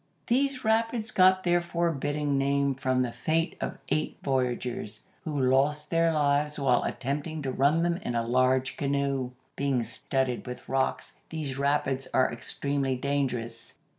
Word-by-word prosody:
These 260 Hz, +1 st, +1 dB
rapids 225 Hz, 0 st, +1 dB
got 185 Hz, 0 st, +5 dB
their 175 Hz, 0 st, +3 dB
forbidding 150 Hz, -4 st, -1 dB
name 140 Hz, 0 st, +2 dB
from 130 Hz, -1 st, +1 dB
the 120 Hz, -, -2 dB
fate 160 Hz, +8 st, 0 dB
of -, -, -3 dB
eight 155 Hz, -, -1 dB
voyagers, 125 Hz, -5 st, -1 dB, 0.2 s
who 150 Hz, -3 st, -2 dB
lost 135 Hz, +3 st, +2 dB
their 165 Hz, 0 st, +3 dB
lives 150 Hz, -1 st, +1 dB
while 130 Hz, -4 st, +3 dB
attempting 145 Hz, +3 st, -3 dB
to 135 Hz, -, -1 dB
run 145 Hz, +6 st, +3 dB
them 170 Hz, 0 st, +1 dB
in 120 Hz, -10 st, -4 dB
a 115 Hz, 0 st, 0 dB
large 130 Hz, +2 st, +2 dB
canoe. 140 Hz, -2 st, 0 dB, 0.3 s
Being 135 Hz, -3 st, 0 dB
studded 125 Hz, +2 st, -2 dB
with 125 Hz, -, -7 dB
rocks, 135 Hz, 0 st, -1 dB
these 150 Hz, -5 st, -3 dB
rapids 140 Hz, -2 st, 0 dB
are 130 Hz, -, +3 dB
extremely 135 Hz, +2 st, -1 dB
dangerous. 125 Hz, -4 st, -2 dB
140 Hz, 145 wpm, -28 LUFS, 130-160 Hz, 0.3 s, got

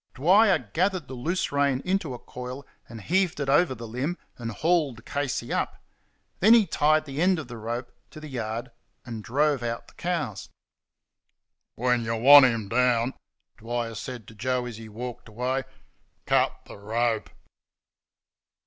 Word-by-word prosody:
Dwyer 190 Hz, +9 st, +5 dB, 0.2 s
gathered 185 Hz, -3 st, 0 dB
the -, -, -8 dB
loose 165 Hz, +9 st, -2 dB
rein 140 Hz, -2 st, +2 dB
into 180 Hz, -8 st, -1 dB
a -, -, -7 dB
coil 125 Hz, +3 st, -8 dB, 0.2 s
and 115 Hz, -1 st, -9 dB
heaved 180 Hz, -, +1 dB
it 140 Hz, -1 st, -2 dB
over 145 Hz, -1 st, +3 dB
the 115 Hz, -1 st, -8 dB
limb, 135 Hz, +10 st, -3 dB, 0.2 s
and 115 Hz, -2 st, -5 dB
hauled 150 Hz, -, 0 dB
Casey 140 Hz, -4 st, -2 dB
up. -, -, -2 dB, 0.6 s
Then 220 Hz, +5 st, +7 dB
he 225 Hz, -3 st, +5 dB
tied 155 Hz, -2 st, +2 dB
the 140 Hz, +1 st, -4 dB
end 185 Hz, +1 st, +4 dB
of 155 Hz, -5 st, -6 dB
the 120 Hz, -1 st, -8 dB
rope 120 Hz, +3 st, -4 dB, 0.2 s
to 155 Hz, -, -11 dB
the 155 Hz, -, -9 dB
yard 120 Hz, -2 st, -4 dB, 0.3 s
and 115 Hz, -3 st, -6 dB
drove 145 Hz, +2 st, +1 dB
out 115 Hz, 0 st, -4 dB
the -, -, -22 dB
cows. 150 Hz, -, -3 dB, 1.3 s
"When 125 Hz, 0 st, +1 dB
y' 115 Hz, 0 st, -2 dB
want 140 Hz, +4 st, +9 dB
'im 115 Hz, -4 st, 0 dB
down," 125 Hz, +2 st, +2 dB, 0.4 s
Dwyer 115 Hz, 0 st, -3 dB
said 115 Hz, 0 st, -7 dB
to -, -, -13 dB
Joe 125 Hz, +3 st, -1 dB
as 120 Hz, -3 st, -7 dB
he 110 Hz, -1 st, -10 dB
walked 120 Hz, +2 st, -7 dB
away, 125 Hz, +4 st, -2 dB, 0.6 s
"cut -, -, +2 dB
the -, -, -11 dB
rope." 115 Hz, +2 st, -1 dB
125 Hz, 160 wpm, -26 LUFS, 115-155 Hz, 1.3 s, want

